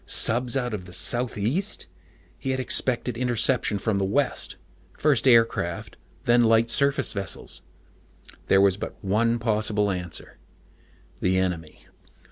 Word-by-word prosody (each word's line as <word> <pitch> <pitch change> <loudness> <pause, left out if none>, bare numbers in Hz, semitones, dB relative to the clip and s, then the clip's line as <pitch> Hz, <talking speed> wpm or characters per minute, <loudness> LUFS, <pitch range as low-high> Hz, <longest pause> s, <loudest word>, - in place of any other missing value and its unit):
Subs 125 +2 +5
out 125 -3 -2
of 95 -4 -5
the 90 - -12
southeast? 120 - -1 0.5
He 135 - -5
had 130 0 -1
expected 125 -1 +1
interception 120 -3 +1
from 100 0 -1
the - - 0
west 125 +8 -1 0.4
first 140 -4 +1
aircraft, 115 -8 +2 0.3
then 120 0 +4
light 115 0 +3
surface 140 -2 +1
vessels. 100 -2 -4 0.9
There 95 - +4
was 100 -1 +3
but - - -7
one 115 +4 +1
possible 105 -2 0
answer: 90 -3 -6 0.8
the 95 +1 +1
enemy. 85 -4 -3
115 Hz, 125 wpm, -24 LUFS, 100-125 Hz, 0.9 s, Subs